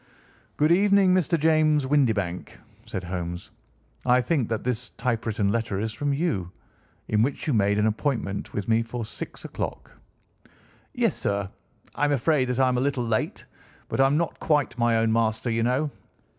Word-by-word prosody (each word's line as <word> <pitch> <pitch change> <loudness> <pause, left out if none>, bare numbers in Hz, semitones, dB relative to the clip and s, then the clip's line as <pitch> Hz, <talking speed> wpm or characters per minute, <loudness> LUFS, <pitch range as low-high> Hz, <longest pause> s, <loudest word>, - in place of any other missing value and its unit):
"Good 150 +2 +3
evening, 195 0 +5
Mr. 170 -2 +2
James 155 -2 +3
Windibank," 110 -11 0 0.3
said 95 - -4
Holmes. 90 -1 -5 0.5
"I 125 0 +4
think 130 -2 0
that 110 -1 -2
this 125 0 -1
typewritten 115 -4 0
letter 110 -2 -1
is 110 +1 -2
from 145 +5 -1
you, 140 - -1 0.6
in 105 0 +2
which 135 +4 -1
you 150 - 0
made 105 -2 +2
an 105 - +2
appointment 110 -3 -2
with 100 -2 -4
me 115 0 +3
for 115 0 -5
six 110 - -8
o'clock?" - - -5 1.0
"Yes, - - +1
sir. 100 -1 -1 0.5
I - - -3
am 145 - +2
afraid 140 0 +2
that 125 0 -2
I 130 - +4
am 125 -1 +1
a - - 0
little 135 -2 0
late, 110 -1 -2 0.4
but - - -3
I 135 - +6
am 140 +2 +2
not 170 0 -2
quite 145 -5 +1
my 120 -1 +2
own 115 0 +2
master, 115 +1 0
you 115 0 0
know. 130 +6 +1
120 Hz, 175 wpm, -25 LUFS, 110-145 Hz, 1.0 s, I